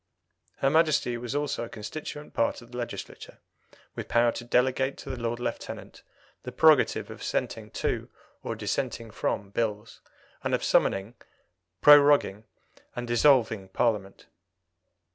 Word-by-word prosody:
Her 135 - +1
Majesty 155 -6 +2
was 120 +3 -5
also 145 -4 -1
a 115 - -7
constituent 150 +7 -7
part 115 - 0
of 120 - -18
the 125 - -7
Legislature, 120 - -7 0.6
with - - -6
power 120 0 +3
to 120 - -7
delegate 130 +2 +1
to 135 - -7
the - - -4
Lord 115 0 -2
Lieutenant 120 - -6 0.4
the 125 - -7
prerogative 155 +2 +4
of - - -10
assenting - - -3
to - - -3 0.3
or - - -4
dissenting 115 -1 -3
from 100 -1 -3
Bills, 110 0 -3 0.4
and - - +1
of - - -4
summoning, 95 +4 +1 0.7
proroguing, 145 -8 +6 0.5
and 120 - -4
dissolving 120 -5 +3
Parliament. 100 -2 -1
120 Hz, 135 wpm, -27 LUFS, 110-140 Hz, 0.7 s, proroguing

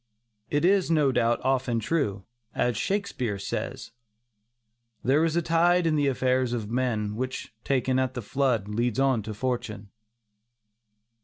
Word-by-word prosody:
It 145 +3 +1
is, 190 -1 +3
no 150 -4 +3
doubt, 120 -1 +1
often 130 -3 +1
true, 105 - -1 0.3
as 120 -1 +1
Shakespeare 130 - -2
says: 100 +3 -5 1.1
"There 140 +5 +3
is 165 -1 +1
a 170 - +1
tide 170 +2 +3
in 160 -1 +2
the 145 -1 +2
affairs 130 -2 +1
of 110 -3 -3
men, 115 -4 -1
Which 130 0 -4
taken 130 -1 +1
at 130 0 -1
the 125 - -4
flood, 120 -2 0
leads 115 +3 -1
on 135 -4 +3
to 110 0 -6
fortune." 105 -4 -3
130 Hz, 145 wpm, -26 LUFS, 115-145 Hz, 1.1 s, is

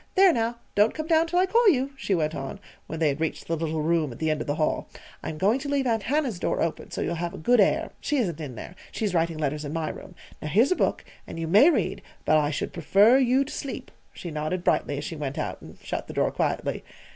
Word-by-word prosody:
"There, 380 -2 +6
now, 230 -1 -1 0.2
don't 210 +2 +3
come 310 - -3
down 325 0 +3
till 350 +2 -1
I 365 - +5
call 455 +3 +4
you," 275 -4 +1
she 210 -8 -1
went 155 -2 0
on, 135 -3 -5 0.3
when 160 - -5
they 160 -2 +3
had 140 +2 -3
reached 165 - -2
the 165 - -1
little 160 -1 -2
room 160 -3 +1
at 115 - -9
the 160 -1 0
end 155 - -1
of - - -5
the 145 - 0
hall. 155 -1 -1 0.3
"I'm 155 - -5
going 205 - +2
to 285 +1 -5
leave 280 -2 +1
Aunt 225 -3 +1
Hannah's 260 - -1
door - - -1
open, 165 - -2
so - - -4
you'll - - -1
have 170 -1 -4
good 245 +4 +4
air 200 - +3
she 295 - 0
isn't 175 - -1
in 135 -5 -6
there. 170 - -8 0.2
She's 210 -4 -2
writing 165 -1 +1
letters 150 0 -2
in 145 0 -5
my 160 -1 -2
room, - - -9 0.3
Now - - -4
here's 220 - +3
a - - +4
book, - - 0 0.2
and - - -7
you 165 - -2
may 210 - +7
read, 340 - 0 0.2
but 155 - +5
I 145 -1 +1
should 150 - -3
prefer 200 - +5
you 260 +1 +3
to 290 - -8
sleep," 275 - -6 0.2
she 170 - -8
nodded 155 +4 -2
brightly 145 - +1
as 145 - -4
she 165 - -5
went 145 -3 -4
out - - -3
and - - -12
shut - - -4
the - - -8
door - - +2
quietly. - - -1
175 Hz, 260 wpm, -26 LUFS, 155-260 Hz, 0.3 s, may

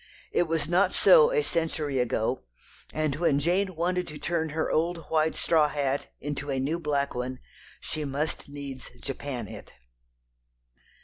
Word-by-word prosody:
It 175 - +2
was 160 -2 0
not 180 +3 +3
so 485 -1 +7
a 460 -3 +2
century 155 - -1
ago, 125 - 0 0.5
and 155 -2 -1
when 155 -4 +3
Jane 180 +5 +1
wanted 180 +2 0
to 150 - -7
turn 160 -1 -1
her 160 +1 -1
old 165 +1 0
white 160 0 +2
straw 160 -3 +4
hat 140 -1 -1
into 145 0 -4
a 135 -1 0
new 150 +6 -1
black 145 -3 0
one, 125 +1 -3 0.4
she 155 - -4
must 145 +2 -3
needs 140 -2 -7
Japan 135 -4 -4
it. - - -10
155 Hz, 150 wpm, -28 LUFS, 140-170 Hz, 0.5 s, so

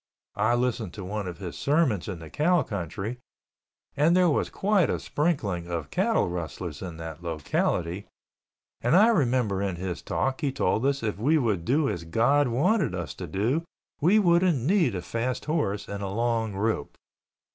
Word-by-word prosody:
I 110 +3 +3
listened 120 -6 -1
to 100 -3 -6
one 100 0 -3
of 90 -2 -6
his 90 -3 -6
sermons 140 - +1
in 95 -4 -4
the 80 -1 -11
cow 170 +3 +3
country 100 +5 -4 0.8
and 155 +5 +4
there 180 -3 +4
was - - 0
quite 195 -4 +2
a - - 0
sprinkling 105 - -1
of 85 -4 -4
cattle - - +2
rustlers 85 -2 -5
in 90 -3 -6
that 80 0 -7
locality 85 +3 -1 0.7
and 120 +8 +3
I 210 +5 +7
remember 125 - +1
in 100 -3 -1
his 90 -1 -4
talk 135 +3 -1
he 145 -3 +1
told 115 0 +1
us 140 -3 0
if 105 -2 -2
we 150 +8 +3
would 105 - 0
do 140 +4 +2
as 85 -10 -3
God 120 - +2
wanted 165 - +1
us 90 -6 -4
to - - -7
do 115 - 0 0.4
we 180 +8 +4
wouldn't 175 -4 +4
need 155 - +2
a 90 - -4
fast 120 +5 -2
horse 125 -11 -1
and 100 0 -5
a 100 - -3
long 115 0 -1
rope. 105 -6 -2
115 Hz, 180 wpm, -27 LUFS, 90-145 Hz, 0.8 s, I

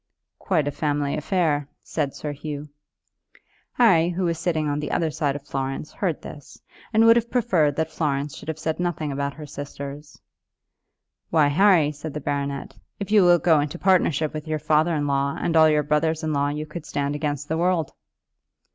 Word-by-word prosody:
"Quite 160 -7 0
a - - 0
family 145 -1 -1
affair," 155 -3 0 0.2
said 145 -4 -3
Sir 150 - -4
Hugh. 150 0 -6 1.0
Harry, 175 -9 +4
who 180 +1 -2
was 170 -2 0
sitting 160 -3 0
on 145 0 -1
the 150 - -4
other 165 -2 0
side 145 -2 -1
of 145 -1 -7
Florence, 135 +2 -4
heard 175 -7 -2
this, 145 -2 -11 0.3
and 225 0 +4
would 230 0 +8
have 235 0 -1
preferred 180 - +2
that 160 0 -1
Florence 145 -2 -2
should - - -11
have 160 -1 -3
said 155 +1 -3
nothing 165 -4 -2
about 140 0 -3
her 150 - -8
sisters. 145 +1 -8 1.1
"Why, 155 -3 +4
Harry," 170 -2 +4
said 150 0 -8
the - - -2
baronet, 140 -1 -3 0.2
"if 200 0 -5
you 210 -3 +6
will 175 -1 +6
go 165 -2 +3
into 145 +4 -2
partnership 165 -5 +2
with 155 0 -6
your 155 0 -1
father 155 +2 +2
in 145 -1 -1
law 140 0 0
and 165 - -1
all 160 -1 +7
your 150 -1 +2
brothers 155 +2 0
in 155 -1 -1
law 145 0 +1
you 150 +1 -3
could 150 +1 -8
stand 145 0 -2
against 145 -1 -3
the 160 +1 -1
world." 175 -3 +1
150 Hz, 190 wpm, -24 LUFS, 145-165 Hz, 1.1 s, would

